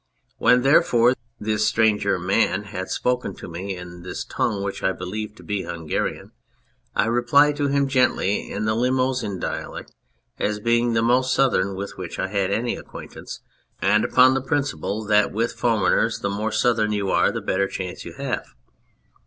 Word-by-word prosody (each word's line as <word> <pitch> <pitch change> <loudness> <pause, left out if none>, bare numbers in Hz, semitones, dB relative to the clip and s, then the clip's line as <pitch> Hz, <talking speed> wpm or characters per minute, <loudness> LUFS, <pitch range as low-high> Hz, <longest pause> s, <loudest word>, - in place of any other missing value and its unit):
When, 125 +1 +4
therefore, 125 -4 +4 0.3
this 105 0 0
stranger 110 -3 +2
man 95 +2 +1
had 95 -2 -6
spoken 125 -6 -1
to - - -9
me 95 +3 -5
in 90 0 -10
this 90 - -6
tongue 100 -1 -1
which 100 0 -4
I 95 - +1
believed 105 +4 -6
to - - -14
be 105 -2 -2
Hungarian, 85 -4 -4 0.6
I - - +3
replied 120 +6 +3
to 145 -1 +1
him 140 0 +1
gently 125 -6 +1
in 105 - -2
the 110 - +1
Limousin 125 -3 0
dialect - - -5 0.5
as 105 0 -1
being 115 +2 +2
the 115 0 +2
most 130 +2 +3
southern 100 -9 +2
with 100 +1 -6
which - - -6
I - - -2
had 100 -1 0
any 115 +4 0
acquaintance, - - -10 0.4
and 105 +2 +3
upon 130 +1 +5
the 135 - 0
principle, 135 -6 -2
that 105 0 +3
with 115 +2 -1
foreigners 115 -1 +1
the 100 - -2
more 105 +2 -2
southern 110 -2 +2
you 100 -2 -1
are - - +3
the - - -3
better 100 +1 0
chance 90 -2 -6
you - - -9
have. - - -3
110 Hz, 170 wpm, -23 LUFS, 100-125 Hz, 0.6 s, upon